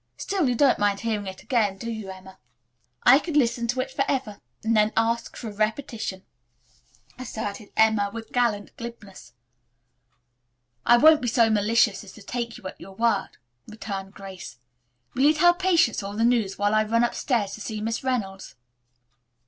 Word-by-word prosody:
Still, 370 -9 0
you 245 - 0
don't 275 +2 +3
mind 205 -1 +1
hearing 215 -3 -2
it 190 0 -8
again, 210 -6 0
do 230 +4 -5
you, 220 -3 -6
Emma?" 190 0 -11 0.6
"I 260 +3 +7
could 315 -1 -2
listen 235 -3 +1
to 250 +2 0
it 265 +1 -6
forever, 265 -6 -2 0.2
and 225 +1 +1
then 210 0 +3
ask 230 +1 0
for 235 - -7
a 215 - -6
repetition," 215 -2 -3 1.0
asserted 215 -4 -6
Emma 220 -2 +3
with 225 0 -8
gallant 230 -5 0
glibness. 235 -5 -10 1.5
"I 240 - +7
won't 310 +4 +6
be 245 - -2
so 230 -1 +3
malicious 215 0 +2
as 195 - -13
to 220 - -14
take 235 0 -4
you - - -16
at - - -10
your 195 0 -11
word," 230 +2 0 0.3
returned 200 -3 -7
Grace. 190 - -10 0.6
"Will 255 - -2
you 300 +3 +5
tell 350 +3 +5
Patience 350 - +2
all 200 +1 -6
the 225 - +1
news 230 -5 +1
while 205 +1 +1
I 215 0 +4
run 230 +2 +1
upstairs 235 -4 -1
to 220 - -8
see 215 0 -5
Miss 225 +3 -3
Reynolds?" 205 -7 -3
225 Hz, 175 wpm, -25 LUFS, 205-245 Hz, 1.5 s, I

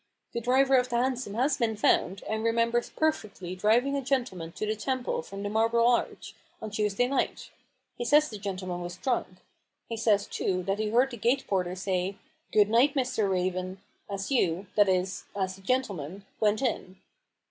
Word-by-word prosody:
The 235 - -2
driver 265 +3 +4
of 250 0 +1
the 240 - -2
hansom 250 -3 -1
has 260 +6 +2
been 230 -3 0
found, 195 -2 +2
and 220 0 -2
remembers 230 +1 +1
perfectly 215 - -2
driving 235 +8 +2
a 280 - 0
gentleman 240 -11 -2
to - - -3
the 215 +1 -1
Temple 255 0 -2
from 195 +4 -8
the 205 - -2
Marble 230 +2 +3
Arch, 240 -1 0 0.3
on 215 - -6
Tues 210 -1 0
day 245 +4 +2
night. 275 +1 -2 0.5
He - - -1
says 300 +4 +5
the 210 -6 -8
gentleman 185 -3 -4
was 175 +1 -6
drunk. 250 +3 0 0.6
He 230 - -2
says, 215 -3 +2
too, 185 -1 -1
that 195 +3 -1
he 215 -1 0
heard 250 +4 +3
the 240 - -6
gate 240 +5 +1
porter 180 -2 -1
say: 185 -1 -1
f 200 - -10 0.4
Good 210 -1 +5
night, 260 +5 +4
Mr. 250 -6 +1
Raven,' 185 0 -1 0.3
as 195 +4 -4
you 185 -7 +1
— - - -33
that 205 -2 +5
is, 185 0 0
as 190 -2 -1
the - - -16
gentleman 195 - -2
went 215 +4 +2
in." 190 -6 -2
215 Hz, 190 wpm, -28 LUFS, 190-245 Hz, 0.6 s, says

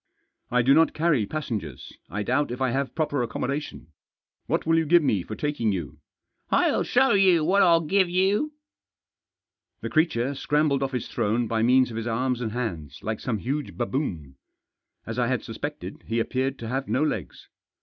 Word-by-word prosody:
" - - -56
I 125 0 +2
do 135 +3 +5
not 160 +2 +4
carry 150 -10 +2
passengers. 110 - -5
I 105 +3 -3
doubt 130 +7 +1
if 125 +1 -5
I 130 -2 +1
have 135 +2 -2
proper 150 -4 0
accommodation. 125 - -4 0.6
What - - 0
will 165 0 +3
you 160 - 0
give 170 +1 +5
me 105 -9 +1
for 110 - -7
taking 145 -7 -1
you? 80 -6 -5 0.2
" - - -58
" - - -41
Fll - - +3
show 265 +2 +3
you 190 -5 +4
what 195 +4 +4
Fll 165 -3 +4
give 190 +1 +3
you." 195 - +1 1.3
The - - -5
creature 140 -5 +1
scrambled 145 0 +1
off 135 0 -2
his 125 - -3
throne 115 +3 0
by 110 0 0
means 125 +2 +4
of 110 - -6
his 115 +1 -3
arms 125 +2 -1
and 110 -3 -2
hands, 85 - -5
like 110 -1 -3
some 120 -4 -2
huge 140 +7 -4
baboon. 95 - -3 0.7
As - - -4
I - - +2
had - - -1
suspected, - - -6
he 115 +1 0
appeared 130 +3 -1
to 115 - -7
have 135 +3 -2
no 135 - +1
legs. 105 - -4
130 Hz, 190 wpm, -25 LUFS, 115-155 Hz, 1.3 s, do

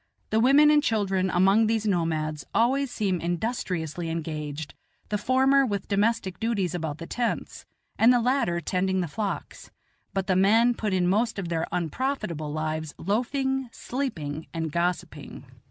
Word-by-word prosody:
The 220 - +3
women 280 +5 +6
and 300 -1 +5
children 195 -7 0
among 195 +5 +4
these 220 -1 0
nomads 160 -5 -1
always 265 +4 +2
seem 195 -7 -1
industriously 175 -3 -2
engaged, 155 -2 -4 0.4
the 210 - 0
former 265 +3 +4
with 200 -6 -2
domestic 200 -3 0
duties 205 -6 -1
about 160 -4 -3
the 165 - -7
tents, 240 +5 -3 0.3
and 230 +2 +7
the 245 - +4
latter 240 -8 +1
tending 190 +3 0
the 175 - -2
flocks; 200 +5 -5 0.4
but 195 -1 -1
the 190 -2 +1
men 225 +6 +4
put 215 -3 -3
in 185 -1 +2
most 220 +5 +1
of 185 -4 -4
their 165 -1 -1
unprofitable 175 - -2
lives 155 0 -3
loafing, 265 - -1
sleeping, 160 - -4
and 160 -1 -2
gossiping. 175 +2 -3
195 Hz, 150 wpm, -26 LUFS, 165-235 Hz, 0.4 s, and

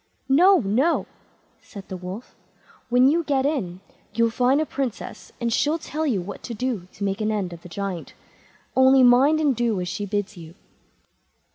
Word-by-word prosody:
"No! 360 +7 +6
no!" 245 +11 +1 0.6
said 200 -3 -11
the 190 - -6
Wolf; 185 +6 -8 0.6
"when 250 +1 +5
you 330 +4 +2
get 275 -3 0
in 195 - -2 0.3
you'll 230 0 +2
find 250 +4 +2
a 310 - +1
Princess, 270 -6 -5
and 235 -2 -1
she'll 300 +7 +1
tell 315 -1 -3
you 205 -10 0
what 195 - -8
to 235 - -6
do 220 -6 -3
to 200 - -7
make 195 +2 -2
an 215 0 0
end 195 -5 -2
of 170 - -11
the 180 - -12
Giant. 190 -1 -5 0.6
Only 260 0 +6
mind 265 +6 +5
and 290 -4 +2
do 230 -4 0
as 180 - -3
she 205 +3 -4
bids 205 0 -3
you." 165 -1 -12
235 Hz, 180 wpm, -23 LUFS, 195-270 Hz, 0.6 s, No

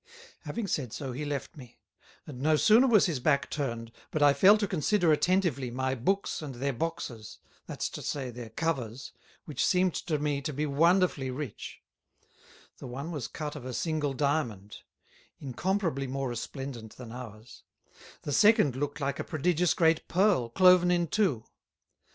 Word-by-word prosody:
Having 235 - -3
said 135 - -2
so, 135 -3 -5
he 140 +5 -4
left 145 -1 -4
me; 125 -5 -13 0.5
and 130 -4 -9
no 155 +2 +3
sooner 220 - +5
was 220 -5 +5
his 160 -7 -1
back 140 +2 +1
turned, 115 -6 -3 0.2
but 155 - 0
I 145 -1 +6
fell 190 +10 +6
to 210 -1 -1
consider 180 0 +2
attentively 155 -5 +1
my 130 +2 -1
Books 190 +13 -1
and 140 -4 -7
their 135 +3 -2
Boxes, 120 -7 -5 0.3
that's - - -3
to - - -8
say, 135 -4 -3
their 120 -1 -8
Covers, 130 -3 -3 0.3
which 145 -4 -2
seemed 180 -2 +2
to 160 -4 -2
me 145 -1 -1
to 150 - -3
be 150 +2 -2
wonderfully 160 -1 +2
Rich; 130 -3 -7 1.0
the - - -8
one 140 +7 -6
was 145 -7 -4
cut 150 -1 -6
of 145 - -8
a 130 0 -5
single 155 -4 -1
Diamond, 125 -9 -1 0.6
incomparably 150 - -2
more 135 0 -3
resplendent 120 -1 -6
than 120 -3 -9
ours; 115 -1 -10 0.6
the 145 - -3
second 210 - +5
looked 145 +2 -3
like 140 -1 -2
a - - -1
prodigious 170 +2 +1
great 165 -2 +2
Pearl, 180 - +2
cloven 180 +6 +5
in 175 -1 +2
two. 155 - +1
145 Hz, 165 wpm, -29 LUFS, 130-170 Hz, 1.0 s, I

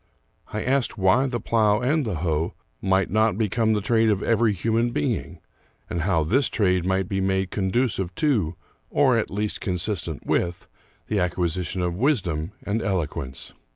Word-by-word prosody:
I 105 - -4
asked 130 -2 +1
why 95 +8 +3
the 120 -2 -2
plow 105 -3 +2
and 145 +5 +1
the 105 - -2
hoe 80 -1 -1 0.3
might 95 -1 +1
not 110 -1 +2
become 110 +1 +1
the 105 - 0
trade 115 +2 +3
of 100 -2 +1
every 115 -1 +3
human 115 +5 +1
being, 75 -11 -2 0.5
and 85 - -1
how 85 -2 +2
this 125 - +2
trade 90 -4 +1
might 95 -1 +1
be 95 0 -1
made 95 0 0
conducive 95 -2 0
to, 105 - +1 0.3
or - - +3
at - - -2
least 105 +2 -3
consistent 90 -2 -2
with, 85 0 -1 0.4
the 105 - -1
acquisition 90 0 -1
of 90 -1 0
wisdom 90 - 0
and 105 +2 -1
eloquence. 80 - -3
95 Hz, 160 wpm, -24 LUFS, 90-115 Hz, 0.5 s, why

